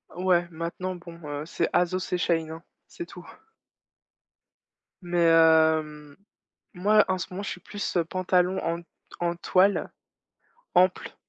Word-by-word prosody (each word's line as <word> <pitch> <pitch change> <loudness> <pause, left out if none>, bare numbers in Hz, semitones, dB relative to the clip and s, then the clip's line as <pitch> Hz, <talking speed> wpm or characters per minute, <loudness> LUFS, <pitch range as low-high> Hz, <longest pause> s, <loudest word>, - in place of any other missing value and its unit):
Ouais, 180 -1 +2
maintenant, 170 +3 -4
bon, 170 -1 -12
heu, 145 +1 -5
c'est 170 0 -1
Asos 180 +1 0
et - - +2
Shein, 165 -2 0
hein, 165 +2 -9 0.2
c'est 170 - -8
tout. 175 0 -12 1.8
Mais 175 -1 +2
heu, 160 -2 +3 0.6
moi, 210 +4 +4
en 185 0 0
ce 175 - -5
moment, 190 +2 -5
je - - -4
suis - - -6
plus 205 -3 -4
pantalons 185 +1 +1
en 170 +1 -2 0.4
en 175 0 -1
toile, 190 +3 +2 0.8
amples. 180 +1 +2
175 Hz, 135 wpm, -26 LUFS, 165-185 Hz, 1.8 s, moi